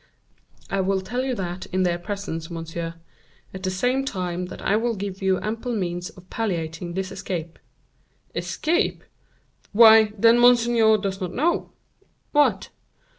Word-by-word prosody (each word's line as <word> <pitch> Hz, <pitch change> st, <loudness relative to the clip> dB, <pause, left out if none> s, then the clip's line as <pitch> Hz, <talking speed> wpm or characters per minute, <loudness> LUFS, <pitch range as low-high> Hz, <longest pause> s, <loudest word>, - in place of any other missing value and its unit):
"I 195 Hz, -, +1 dB
will 190 Hz, 0 st, 0 dB
tell 245 Hz, +7 st, -3 dB
you 260 Hz, -1 st, -1 dB
that 180 Hz, -2 st, -5 dB
in 185 Hz, +1 st, 0 dB
their 175 Hz, -1 st, 0 dB
presence, 175 Hz, -4 st, -5 dB
monsieur; 165 Hz, 0 st, -5 dB, 0.6 s
at 190 Hz, -, -7 dB
the 190 Hz, -, -1 dB
same 250 Hz, +8 st, 0 dB
time 180 Hz, -7 st, -3 dB
that -, -, -9 dB
I 205 Hz, -, +1 dB
will 230 Hz, +1 st, 0 dB
give 195 Hz, -1 st, -5 dB
you 190 Hz, -1 st, +2 dB
ample 230 Hz, +4 st, -3 dB
means 175 Hz, -3 st, -3 dB
of 185 Hz, -1 st, -16 dB
palliating 170 Hz, -5 st, -3 dB
this 190 Hz, 0 st, -3 dB
escape." 180 Hz, -4 st, -5 dB, 0.7 s
"Escape! 345 Hz, +6 st, -1 dB, 0.7 s
Why, 220 Hz, -1 st, +8 dB
then, 230 Hz, +3 st, +5 dB
monseigneur 235 Hz, -2 st, +5 dB
does 195 Hz, -1 st, -4 dB
not 180 Hz, -2 st, -3 dB
know?" 335 Hz, +6 st, +1 dB, 0.6 s
"What?" 295 Hz, 0 st, +2 dB
195 Hz, 145 wpm, -24 LUFS, 180-230 Hz, 0.7 s, Why